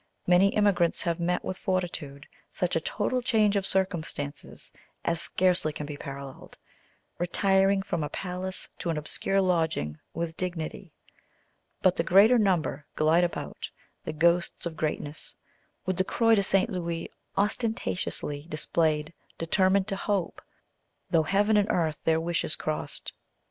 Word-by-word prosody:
Many 180 +2 +5
emigrants 195 -5 +3
have 170 0 -1
met, 175 +1 0
with 185 - -3
fortitude, 170 -7 -3 0.2
such 180 -2 -1
a 165 - +2
total 255 +9 -1
change 215 -4 +3
of 195 -1 0
circumstances 170 -6 -3 0.3
as 170 -1 +1
scarcely 180 -4 +2
can 150 0 -6
be 145 0 -6
paralleled, 140 -1 -9 0.6
retiring 195 +2 +3
from 165 -5 -2
a 150 - -3
palace 185 0 -4
to 175 - -3
an 165 - 0
obscure 195 +5 0
lodging 160 - 0
with 165 0 -4
dignity; 175 -4 -3 0.9
but 185 -2 +5
the - - +2
greater 205 +8 +6
number 175 -8 +1
glide 160 +3 +4
about, 175 - -4 0.3
the - - -3
ghosts 170 +3 +1
of 170 -2 -4
greatness, 150 -1 -3 0.5
with 185 -1 -1
the 185 - +3
Croix 230 +4 +3
de 210 - +5
St. 195 0 +3
Louis 170 -2 -3 0.3
ostentatiously 200 -8 -1
displayed, 155 0 0 0.2
determined 190 +3 +2
to 195 - -1
hope, 195 -2 -2 0.7
"though 165 - +5
heaven 205 +6 +3
and 205 +1 +2
earth 160 -3 0
their 160 0 +3
wishes 165 -1 -1
crossed." 155 -1 -4
175 Hz, 140 wpm, -28 LUFS, 160-195 Hz, 0.9 s, greater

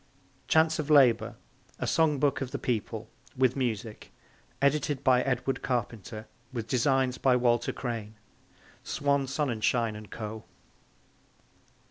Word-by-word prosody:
Chants 160 0 +3
of 155 -1 -3
Labour: 120 -7 +5 0.4
A - - -3
Song 160 -3 +2
Book 140 0 +1
of 135 - -3
the - - -4
People. 115 -5 -3 0.3
With 130 -1 +3
Music. 115 -4 -3 0.5
Edited 140 0 +1
by 125 -2 +4
Edward 135 0 -1
Carpenter. 115 -3 -3 0.3
With 115 -3 -4
Designs 130 0 +1
by 130 -2 +4
Walter 120 -1 +2
Crane. 115 -4 -5 0.7
(Swan 140 -1 0
Sonnenschein 120 -5 0
and 105 -1 -10
Co.) 110 -1 -6
125 Hz, 120 wpm, -28 LUFS, 115-140 Hz, 0.7 s, Labour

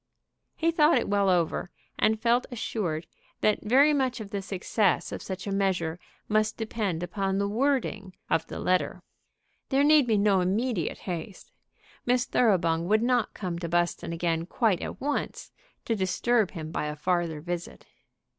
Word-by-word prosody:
He 330 +1 +1
thought 315 -1 +4
it - - 0
well 200 -1 +2
over, 175 0 +1 0.3
and 220 0 +3
felt 240 +2 +2
assured 185 -9 -3 0.4
that 215 - +2
very 270 +8 +5
much 260 -4 0
of 205 -2 -8
the 200 - -2
success 195 +1 0
of - - -5
such 190 -1 -6
a 200 - -3
measure 180 -4 0 0.3
must 215 0 +1
depend 210 -6 -2
upon 195 +2 -1
the 200 0 +1
wording 215 -5 -1
of 160 - 0
the - - -7
letter. 185 0 0 0.7
There 275 +1 +3
need 295 -3 +5
be 220 -2 +3
no 200 -2 +3
immediate 200 0 -1
haste. 185 +2 -6 0.5
Miss 245 0 +2
Thoroughbung 170 -9 +2
would 215 +3 +3
not 245 -2 +1
come 180 -4 -4
to 170 -1 -4
Buston 175 0 0
again 165 0 -1
quite 210 -4 +1
at - - -6
once 290 +2 -3 0.3
to 230 - 0
disturb 210 +2 +1
him 160 -3 -7
by 150 - -2
a 150 - -4
farther 170 0 -1
visit. 175 +2 -6
200 Hz, 165 wpm, -27 LUFS, 175-235 Hz, 0.7 s, very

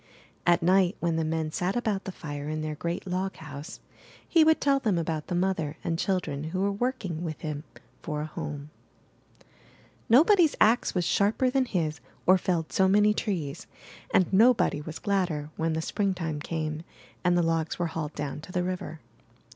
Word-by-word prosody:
At 175 -1 +4
night, 185 +2 +3
when 170 -1 0
the 165 - +1
men 160 0 -1
sat 180 +4 -1
about 215 -5 -1
the 190 - -4
fire 145 -4 -6
in 155 0 -3
their 155 0 -3
great 170 +5 -4
loghouse, 180 -4 -5 0.5
he 330 -2 +5
would 315 0 +4
tell 275 -1 +3
them 215 -8 +1
about 160 -2 -2
the 180 - -2
mother 175 -4 -1
and 165 -1 -1
children 180 -8 -1
who 175 +4 -3
were 200 +1 +2
working 200 -7 -2
with 155 -3 -5
him 150 0 -4 0.4
for 150 -2 -3
a - - -3
home. 150 -1 -6 1.4
Nobody's 325 - +6
ax 230 0 +3
was 180 -2 +1
sharper 220 +8 +2
than 265 0 +2
his 160 - -1 0.3
or 185 +1 +6
felled 170 -3 -1
so 190 - +4
many 210 +2 +4
trees, 175 -11 -3 0.4
and 185 0 +3
nobody 225 -7 +4
was 155 +1 -7
gladder 175 -7 -1
when 160 0 -1
Spring 195 +3 -1
time 160 -4 -3
came 155 0 -3 0.4
and 175 -1 +3
the 175 - +3
logs 165 -1 0
were 175 - 0
hauled 155 -2 -4
down 145 0 -4
to 180 - -11
the 180 -1 0
river. 180 -3 -4
175 Hz, 180 wpm, -27 LUFS, 155-195 Hz, 1.4 s, Nobody's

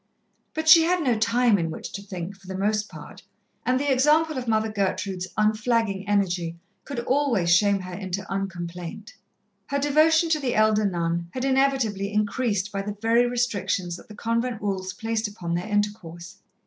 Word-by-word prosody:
But 315 0 -3
she 325 +1 +9
had 355 0 +1
no 250 -4 +2
time 225 0 +3
in 165 -1 -1
which 160 - -7
to 200 - -6
think, 190 -1 -6
for 195 -1 -19
the 190 0 -5
most 210 +2 0
part, - - -11 0.5
and 255 +1 +3
the 285 0 0
example 300 +4 +3
of 255 -2 -4
Mother 220 -1 +1
Gertrude's 195 -2 -2
unflagging 215 -2 +1
energy 180 -5 0 0.3
could 275 -5 -4
always 235 -10 +2
shame 200 0 +3
her 185 0 -8
into 190 +1 -4
un 195 0 -2
complaint. 175 +4 -7 0.5
Her 280 - -1
devotion 310 +4 +4
to 315 -1 +2
the 260 -4 -1
elder 215 0 +3
nun 170 -1 -2
had 255 0 -2
inevitably 260 -7 +1
increased 210 -1 0
by 195 - -2
the 205 +1 -6
very 230 +2 +3
restrictions 200 -7 -1
that - - -15
the 210 - -12
convent 230 +1 -1
rules 190 -2 -3
placed 225 +2 -2
upon 180 -5 -5
their 175 +4 -2
intercourse. 205 -5 -3
210 Hz, 175 wpm, -25 LUFS, 190-245 Hz, 0.5 s, she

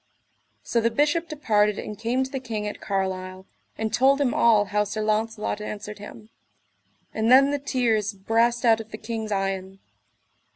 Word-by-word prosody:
So 235 - 0
the 230 - +2
Bishop 295 +7 +1
departed 210 -9 +1
and 210 - -6
came 235 +5 -1
to 265 - -7
the 270 - -3
king 220 -5 -4
at 210 - -7
Carlisle, 190 -1 -3 0.3
and 220 -1 -3
told 275 +2 +4
him 270 -4 +1
all 215 -3 +4
how 210 +1 0
Sir 210 +1 -4
Launcelot 215 0 -1
answered 210 0 -7
him; 215 +1 -11 0.8
and 220 +1 0
then 270 +2 +7
the 290 - -1
tears 235 -6 0
brast 230 +4 +1
out 225 -1 +4
of 220 - -12
the 215 - -7
king's 220 -1 -5
eyen. 195 -1 -2
220 Hz, 170 wpm, -25 LUFS, 210-240 Hz, 0.8 s, then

